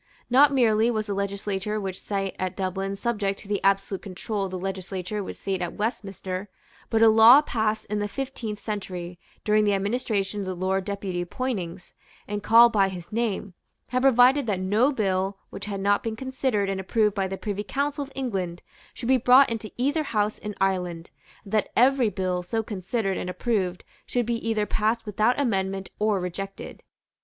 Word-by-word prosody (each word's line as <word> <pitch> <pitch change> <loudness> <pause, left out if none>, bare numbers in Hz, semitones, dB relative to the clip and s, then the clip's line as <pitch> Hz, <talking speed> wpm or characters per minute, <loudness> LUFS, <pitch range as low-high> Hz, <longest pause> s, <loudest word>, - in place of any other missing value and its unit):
Not 280 +3 +7
merely 230 -4 +3
was 215 -2 -1
the 205 - -3
Legislature 200 +1 -2
which 190 -2 -4
sate 195 -2 -3
at 185 0 -2
Dublin 195 +1 -2
subject 200 -2 -1
to - - -14
the 205 -1 -1
absolute 195 0 +1
control 195 +1 -4
of - - -5
the 185 - -4
Legislature 190 +1 -4
which - - -6
sate 190 -2 -3
at 175 - -3
Westminster: 195 -3 -3 0.4
but 225 0 +3
a - - +8
law 225 +6 +8
passed 220 -5 -1
in 210 0 -2
the 205 - -1
fifteenth 235 -3 -5
century, 180 -5 -5 0.2
during 215 0 +3
the 205 -1 +3
administration 205 -1 -1
of 195 - -4
the 185 - -3
Lord 190 +1 -1
Deputy 195 -3 -3
Poynings, 185 -5 -4 0.3
and 205 0 -3
called 230 +2 +7
by 195 -2 +3
his 175 -2 -9
name, 210 -4 -2 0.4
had 255 +1 0
provided 260 +1 +5
that 200 -4 0
no 210 +9 +2
bill 195 -5 0
which - - -7
had 200 -1 -4
not 200 +1 +2
been 225 -1 -3
considered 260 -4 -1
and 195 -1 -2
approved 210 +1 +1
by 195 -1 -1
the 195 0 -5
Privy 205 0 -3
Council 285 +6 -2
of 275 - -11
England 190 -10 -3 0.3
should 235 - -6
be 260 +1 +5
brought 250 +2 +6
into 220 -1 -4
either 285 +6 +1
House 215 -7 -1
in 210 -1 -6
Ireland, 180 -3 -1 0.3
and 200 - -12
that 215 - +2
every 255 -1 +4
bill 185 -3 -2
so 220 +6 -2
considered 195 0 -2
and 180 - -4
approved 185 -1 -1 0.2
should 245 -1 0
be 230 0 -2
either 215 -2 +1
passed 220 +3 0
without 215 +5 +1
amendment 195 -6 -1
or 210 -2 +2
rejected. 195 +2 -6
205 Hz, 185 wpm, -25 LUFS, 190-230 Hz, 0.4 s, a